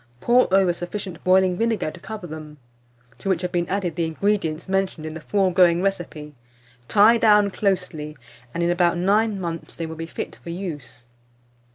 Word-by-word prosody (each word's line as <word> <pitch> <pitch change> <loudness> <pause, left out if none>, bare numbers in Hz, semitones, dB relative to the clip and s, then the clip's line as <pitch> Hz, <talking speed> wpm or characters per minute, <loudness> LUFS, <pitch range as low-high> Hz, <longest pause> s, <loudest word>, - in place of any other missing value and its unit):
Pour 245 - +3
over 190 -2 +4
sufficient 175 0 -6
boiling 185 -1 +3
vinegar 225 -8 0
to 175 - -13
cover 215 0 -7
them, 155 -2 -9 0.6
to 195 - -4
which 185 -1 0
have 180 - -2
been 175 -1 -1
added 185 -4 -1
the 170 -2 0
ingredients 170 -1 -1
mentioned 190 -4 -1
in 155 - -5
the 160 - -8
foregoing 180 -2 +3
recipe; 160 -6 -3 0.5
tie 220 +3 +5
down 210 -2 +5
closely, 180 -7 -2 0.3
and 170 - -2
in 170 - +2
about 175 -1 +2
9 205 +3 +2
months 170 -2 -5
they 165 - -4
will 160 0 -7
be 165 +1 -6
fit - - -6
for - - -11
use. 160 -9 -7
180 Hz, 175 wpm, -23 LUFS, 165-195 Hz, 0.6 s, tie